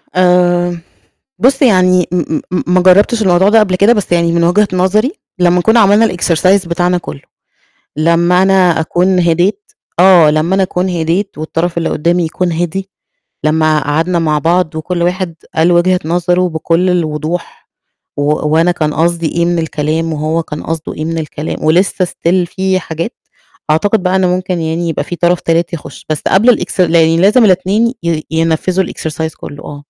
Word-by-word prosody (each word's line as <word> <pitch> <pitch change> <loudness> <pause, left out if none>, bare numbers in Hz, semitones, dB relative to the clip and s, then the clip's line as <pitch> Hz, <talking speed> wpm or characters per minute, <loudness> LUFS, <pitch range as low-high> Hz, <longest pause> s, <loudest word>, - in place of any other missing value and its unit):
آآ، 175 -1 +2 0.6
بُص 265 +5 +2
يعني 185 -7 +3
م 160 -3 -1
م 180 - -1
ما 180 0 +2
جربتش 205 +5 +3
الموضوع 190 0 +3
ده 225 +1 +5
قبل 190 -4 +1
كده، 200 +5 +4
بس 205 -6 -3
يعني 170 -1 +2
من 170 0 +1
وجهة 200 +5 +2
نظري، 200 +8 +1 0.3
لمّا 180 0 +3
كنا 220 +5 +3
عملنا 210 +2 +4
الExercise 180 +1 +1
بتاعنا 175 +1 0
كله، 75 - -8 0.8
لمّا 170 +3 +2
أنا 185 -4 +3
أكون 180 +3 0
هديت 175 +4 +1 0.4
آه 175 -4 +6
لمّا 155 +5 0
أنا 195 - +2
أكون 185 0 -2
هديت 175 +2 -2
والطرف 165 +2 -3
اللي 165 - -1
قدامي 170 +3 0
يكون 175 +2 -2
هدي، 175 +4 -3 0.6
لمّا 155 0 +2
قعدنا 165 +4 -1
مع 155 -2 0
بعض 170 +1 0
وكل 170 +2 -3
واحد 180 -1 -2 0.2
قال 165 +2 +2
وجهة 180 +1 +2
نظره 180 +2 0
بكل 165 +3 0
الوضوح، 165 -1 -3 0.5
و 145 - -1 0.3
وأنا 165 +3 +2
كان 155 -3 -2
قصدي 170 +2 0
إيه 170 +2 -1
من 175 -1 0
الكلام 160 +1 -2
وهو 155 +2 -2
كان 150 -1 -7
قصده 160 -1 -5
إيه 155 - -5
من 165 +1 -3
الكلام، 155 -1 -5
ولسه 180 +3 +2
Still 175 +1 -1
في 190 -1 0
حاجات، 165 +7 -5 0.6
أعتقد 200 +5 +1
بقى 185 +1 +1
ممكن 185 -1 -1
يعني 165 +1 -2
يبقى 160 - -2
في 175 - -6
طرف 175 +1 +1
تالت 165 +1 -1
يخش، 165 - -9
بس 155 - -2
قبل 205 +6 +3
الإكس 220 -5 +1
لازم 170 +7 +3
الاتنين 200 +6 +1
ي 165 -2 -2
ينفذوا 165 +3 0
الExercise 160 -1 -5
كله 145 0 -10
آه. 145 - -8
175 Hz, 165 wpm, -13 LUFS, 165-185 Hz, 0.8 s, آه